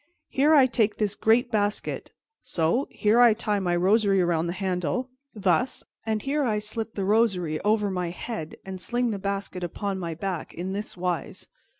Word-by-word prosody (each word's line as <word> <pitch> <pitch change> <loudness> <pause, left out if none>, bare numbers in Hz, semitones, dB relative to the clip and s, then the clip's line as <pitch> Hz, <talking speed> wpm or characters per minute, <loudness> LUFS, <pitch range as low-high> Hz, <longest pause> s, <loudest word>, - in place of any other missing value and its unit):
Here 295 +4 +4
I 275 -3 +7
take 225 -4 +1
this 210 -2 0
great 235 +4 +2
basket, 205 -1 -1 0.3
so; 170 - 0
here 220 +2 +2
I 235 -3 +7
tie 210 -2 -1
my 175 -2 0
rosary 195 +2 +3
around 170 -2 +1
the 170 - -2
handle, 185 - -2 0.2
thus; 195 +3 +1 0.2
and 220 -1 0
here 290 +2 0
I 220 -5 +1
slip 220 +1 -3
the 195 - -1
rosary 190 -7 +2
over 210 -1 +2
my 180 -2 -2
head 175 -2 -6
and 190 -1 -6
sling 240 +3 0
the 200 - -3
basket 195 -2 -3
upon 195 +3 -3
my 170 -3 -4
back, 180 0 -4
in 185 +3 -4
this 205 -1 -5
wise." 180 -1 -3
200 Hz, 180 wpm, -26 LUFS, 180-225 Hz, 0.3 s, I